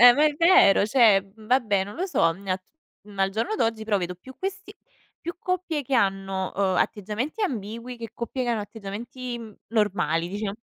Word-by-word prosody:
Eh, 245 0 +11
ma 290 +5 +3
è 300 -1 +3
vero. 335 - +6
Cioè, 215 -4 +5
vabbè 220 -3 +1
non 205 - -9
lo 370 +4 -1
so, 165 - +3
mhmm, 190 - -14
nat 185 -1 -2 0.4
ma 200 -2 -2
al 195 - +2
giorno 225 - -1
d'oggi 225 - 0
però 210 -2 +1
vedo 180 -1 -3
più 260 +9 -13
questi 395 +2 -5 0.5
più 340 +2 -5
coppie 360 -5 -2
che 270 +1 -2
hanno, 195 -3 0
uhm, 190 -2 +1
atteggiamenti 220 - -1
ambigui 235 - -3
che 230 -2 -7
coppie 245 +2 -4
che - - -2
hanno 225 -2 0
atteggiamenti 230 +4 -6 0.3
normali 195 -6 +1
diciam 205 +1 -4
225 Hz, 185 wpm, -25 LUFS, 195-265 Hz, 0.5 s, Eh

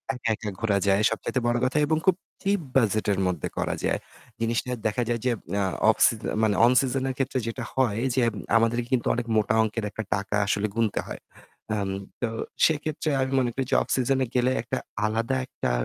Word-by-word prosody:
একা, 115 - -3
একা 105 0 -5
ঘোরা 110 -3 +1
যায়। 100 +1 +4
সবচাইতে 115 +3 -2
বড় 120 0 +2
কথা 130 - 0
এবং 155 - +2
খুব 190 -2 +5 0.3
চিপ 200 -1 +1
বাজেটের 110 -5 +2
মধ্যে 90 -5 -2
করা - - -1
যায়। - - +1 0.4
জিনিসটা 115 +2 0 0.2
দেখা 120 +3 0
যায় 120 - 0
যে 125 - +3 0.3
আ - - +2 0.3
অফ - - +5
সিজ - - +2 0.2
মানে 105 -2 +3
অন 120 - +5
সিজন 130 0 -1
এর 130 - -3
ক্ষেত্রে 135 -1 0
যেটা 115 +2 -4
হয়, 120 -4 +1
যে 130 - +3 0.4
আমাদেরকে 115 +1 +1
কিন্তু 125 - +1
অনেক 120 -1 -3
মোটা 110 +1 +2
অংকের 110 +1 -2 0.3
টাকা 100 +1 -3
আসলে 105 +1 +1
গুনতে 115 -3 +1
হয়। - - -7 0.5
আম 100 -2 -1 0.3
তো 120 - 0 0.4
সেক্ষেত্রে 155 0 0
আমি 130 0 -1
মনে 120 -2 +1
করি 135 +1 -2
যে - - +4
অফ - - -4
সিজনে 130 +1 +1
গেলে 125 +1 +3
একটা 120 - -3 0.3
আলাদা 115 +4 0
একটা - - -3
120 Hz, 195 wpm, -26 LUFS, 110-130 Hz, 0.5 s, খুব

